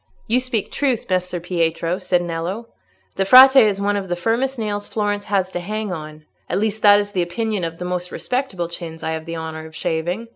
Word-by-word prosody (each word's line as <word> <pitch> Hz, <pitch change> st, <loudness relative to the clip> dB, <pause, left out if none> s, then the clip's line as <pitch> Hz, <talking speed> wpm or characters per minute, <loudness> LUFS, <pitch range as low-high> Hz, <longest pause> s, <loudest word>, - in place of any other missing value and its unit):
"You 240 Hz, +3 st, +2 dB
speak 250 Hz, -4 st, -3 dB
truth, 265 Hz, -5 st, -1 dB
Messer 180 Hz, -1 st, 0 dB
Pietro," 170 Hz, 0 st, -1 dB
said 180 Hz, -2 st, +1 dB
Nello; 175 Hz, +7 st, -4 dB, 0.5 s
"the 195 Hz, -, +2 dB
Frate 260 Hz, +7 st, +9 dB
is 210 Hz, -6 st, +5 dB
one 205 Hz, +1 st, +1 dB
of 195 Hz, -2 st, -3 dB
the 175 Hz, -, 0 dB
firmest 235 Hz, +9 st, 0 dB
nails 205 Hz, -2 st, -3 dB
Florence 205 Hz, -1 st, -2 dB
has 190 Hz, -2 st, 0 dB
to 175 Hz, -, -3 dB
hang 210 Hz, +3 st, -4 dB
on—at 155 Hz, -1 st, -7 dB
least, 215 Hz, +1 st, -1 dB
that 205 Hz, -1 st, +7 dB
is 205 Hz, 0 st, -3 dB
the 185 Hz, -3 st, 0 dB
opinion 200 Hz, +3 st, -2 dB
of 165 Hz, 0 st, -4 dB
the 180 Hz, -, -5 dB
most 180 Hz, 0 st, -3 dB
respectable 250 Hz, -10 st, -2 dB
chins 165 Hz, -1 st, -8 dB
I 160 Hz, -, -1 dB
have 160 Hz, 0 st, -4 dB
the 165 Hz, -1 st, -5 dB
honour 160 Hz, 0 st, -6 dB
of 160 Hz, -, -15 dB
shaving. 175 Hz, +7 st, -2 dB
190 Hz, 210 wpm, -21 LUFS, 170-215 Hz, 0.5 s, Frate